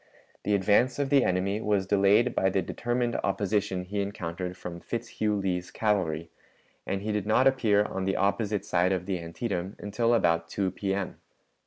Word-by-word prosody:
The 105 - +1
advance 105 +6 +3
of 140 -1 -1
the 140 -3 +5
enemy 95 +3 0
was 105 -3 +1
delayed 100 +5 +3
by 95 - +2
the 95 -1 0
determined 120 +4 -1
opposition 100 -1 0
he 100 +2 -2
encountered 90 -2 -4
from 85 -1 -7
Fitzhugh 110 0 -2
Lee's 90 -3 -2
cavalry, 85 -7 -1 0.6
and 95 0 -2
he 110 - -1
did 105 -1 -2
not 120 +4 +4
appear 110 -6 +3
on 95 -2 -3
the 95 - 0
opposite 100 0 0
side 90 -2 +2
of 90 -1 -2
the 95 -2 -2
Antietam 90 +2 -4
until 115 +3 +1
about 85 -5 +2
2 95 0 -1
P.M. 95 0 -3
100 Hz, 170 wpm, -28 LUFS, 90-105 Hz, 0.6 s, the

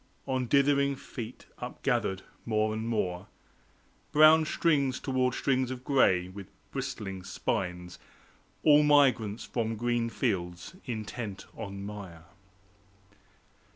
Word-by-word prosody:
On 130 -2 -1
dithering 140 +1 +3
feet 120 -3 -8
upgathered, 95 0 -1 0.2
more 110 -1 +1
and 110 +1 -3
more, 90 -6 -1 0.8
Brown 155 +1 +7
strings 140 -5 +1
towards 130 -2 0
strings 130 -2 +1
of 130 -1 -6
gray, 95 -11 +3
with 95 +1 -9 0.2
bristling 95 -3 -5
spines, 90 -1 -3 0.6
All 150 -1 +7
migrants 135 -8 +3
from 115 -2 -2
green 120 +1 0
fields, 90 - -2
intent 110 -4 -5
on 100 -3 -6
mire. 100 -6 -8
115 Hz, 105 wpm, -29 LUFS, 100-135 Hz, 0.8 s, Brown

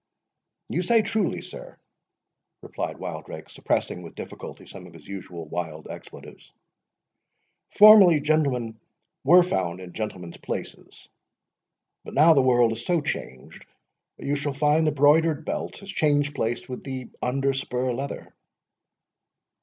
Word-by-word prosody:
"You 175 - -1
say 225 +4 +3
truly, 210 -1 -1
sir," - - -11 0.9
replied - - -5
Wildrake, - - -8
suppressing, 90 - -2
with 85 - -11
difficulty, - - -9
some 90 -2 -11
of 85 - -16
his 80 - -15
usual 90 -4 -8
wild 80 -1 -6
expletives; - - -12 1.2
"formerly 205 -6 +8
gentlemen 140 -7 0 0.4
were 175 +6 +7
found 95 - -2
in 90 -1 -10
gentlemen's 95 -6 -6
places, - - -7 1.0
but - - -10
now 160 +3 +7
the 140 - +4
world 120 -3 +4
is 110 +1 -5
so 175 +3 +1
changed 65 - -6 0.5
that - - -10
you 145 - 0
shall 145 0 -3
find 150 +3 +2
the - - +3
broidered 150 +2 +3
belt - - -4
has 200 - -12
changed 145 -1 +1
place 120 -3 -2
with 125 - -7
the 130 -2 -6
under 135 +2 0
spur 125 -1 -2
leather." 135 +3 -6
135 Hz, 135 wpm, -25 LUFS, 105-155 Hz, 1.2 s, formerly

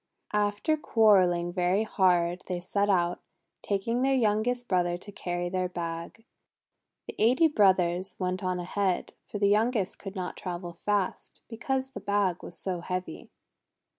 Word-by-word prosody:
After 210 +9 +1
quarrelling 185 - +3
very 180 +3 +2
hard, 180 -4 +2
they 180 -1 -2
set 200 +3 0
out, 175 -2 +1 0.4
taking 220 +5 -1
their 270 +1 +3
youngest 240 +1 +1
brother 175 -2 +1
to 205 +3 -11
carry 175 -2 -3
their 185 0 -1
bag. 170 +5 -6 0.8
The - - -6
eighty 255 +9 +5
brothers 185 - +2
went 185 0 -2
on 185 -1 -1
ahead, 185 +1 -1
for - - -5
the 200 0 +3
youngest 215 -1 +1
could 195 0 -8
not 185 -2 -4
travel 175 -1 -5
fast 200 +2 -2
because 265 +3 -2
the 205 - -7
bag 200 -3 0
was 175 - -9
so 185 -2 -2
heavy. 180 -2 -5
190 Hz, 145 wpm, -28 LUFS, 180-210 Hz, 0.8 s, eighty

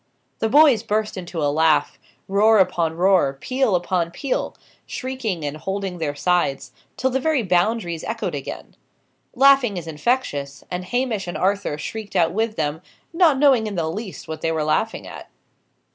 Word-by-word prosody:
The 225 - 0
boys 280 -4 +6
burst 215 -1 -1
into 175 -4 -5
a 145 0 +1
laugh; 160 0 +2 0.3
roar 215 +3 +4
upon 170 -4 +1
roar, 180 -7 +3
peal 255 - +1
upon 175 -1 0
peal; 255 +10 -3 0.3
shrieking 235 - -4
and 145 +1 -3
holding 190 +1 -4
their 145 -3 -2
sides, 175 -3 0 0.3
till 260 0 0
the 265 - 0
very 295 -3 +1
Boundaries 180 -2 0
echoed 230 +1 -3
again. - - -7 0.6
Laughing 265 -5 +5
is 170 - -5
infectious, 150 - -2
and 180 0 -4
Hamish 235 -3 -1
and 175 - -4
Arthur 195 -5 0
shrieked 205 +7 -7
out 170 -2 +3
with 220 +1 -1
them, 155 +1 -2 0.3
not 330 -5 +4
knowing 265 -6 +4
in 205 - -5
the 165 -3 -1
least 205 +1 -7
what 160 0 -6
they 165 - 0
were 160 -1 -1
laughing 155 0 -1
at. - - -10
190 Hz, 165 wpm, -22 LUFS, 165-230 Hz, 0.6 s, boys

